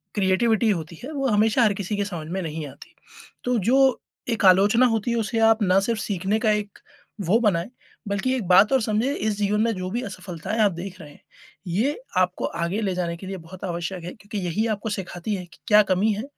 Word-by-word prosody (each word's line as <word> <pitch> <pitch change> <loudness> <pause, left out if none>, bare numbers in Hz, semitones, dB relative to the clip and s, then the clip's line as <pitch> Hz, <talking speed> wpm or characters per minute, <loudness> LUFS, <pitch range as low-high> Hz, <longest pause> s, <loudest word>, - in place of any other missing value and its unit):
Creativity 215 +3 +2
होती 170 -3 -2
है, 285 - -6
वो 275 -2 -1
हमेशा 220 +2 +3
हर 210 -3 +3
किसी 200 +1 -3
के 205 - +1
समझ 170 -6 -6
में 190 +4 -3
नहीं 160 -2 -5
आती। 140 +1 -14 0.5
तो 250 -1 +1
जो, 260 +5 +3 0.3
एक 225 -3 0
आलोचना 200 +7 +6
होती 225 0 0
है 235 - 0
उसे 225 +1 -1
आप 225 0 +3
ना 185 0 +4
सिर्फ़ 225 +1 -1
सीखने 200 +2 -1
का 220 -1 +2
एक 210 -1 -3 0.5
वो 200 +8 +3
बनाएँ, 200 -4 +1 0.4
बल्कि 210 +6 0
एक 240 - -2
बात 190 +6 +6
और 260 - +4
समझें, 220 +5 0
इस 215 -6 -2
जीवन 210 +1 +1
में 230 0 +2
जो 185 0 -4
भी 240 +4 -2
असफलताएँ 185 +1 -5
आप 205 -2 +4
देख 185 +2 -7
रहे 150 - -11
हैं, - - -18 0.5
ये 230 - 0 0.2
आपको 185 0 +1 0.2
आगे 195 +6 -2
ले 190 -3 -1
जाने 170 -2 -2
के 190 - -9
लिए 190 0 -5
बहुत 175 +2 -12
आवश्यक 175 0 -4
हैं 180 - -7
क्योंकि 205 +1 -8
यही 210 +7 0
आपको 215 +2 -5
सिखाती 195 0 -4
है 180 -2 -6
कि 170 - -20
क्या 210 0 +7
कमी 200 +4 +3
है 210 +3 -4
205 Hz, 225 wpm, -24 LUFS, 185-220 Hz, 0.5 s, क्या